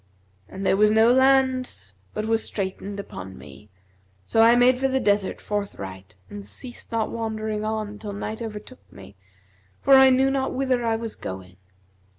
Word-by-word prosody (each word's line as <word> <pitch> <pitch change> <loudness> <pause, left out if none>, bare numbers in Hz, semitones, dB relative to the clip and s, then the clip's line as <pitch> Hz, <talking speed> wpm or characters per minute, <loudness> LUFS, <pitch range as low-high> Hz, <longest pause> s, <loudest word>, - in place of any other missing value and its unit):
And 190 +1 -6
there 195 - +3
was 210 +1 +5
no 220 +2 +5
land 260 - +2 0.2
but 215 - -2
was 225 0 +1
straitened 200 0 -5
upon 95 - -8
me; 75 +9 -14 0.6
so 225 - +2
I 230 +1 +7
made 250 +1 +4
for 270 - +2
the 265 0 0
desert 205 -4 +1
forthright 100 - -6
and 100 +1 -9
ceased 240 - -8
not 225 -1 -1
wandering 220 -2 -3
on 215 -1 -3
till 210 - -6
night 215 +2 -5
overtook 225 +3 -9
me, 100 +1 -14 0.6
for 275 - +3
I 265 0 +8
knew 265 +1 +3
not 270 -1 -1
whither 255 -2 0
I 225 -1 +1
was 225 -1 -5
going. 95 -1 -8
220 Hz, 165 wpm, -24 LUFS, 195-250 Hz, 0.6 s, I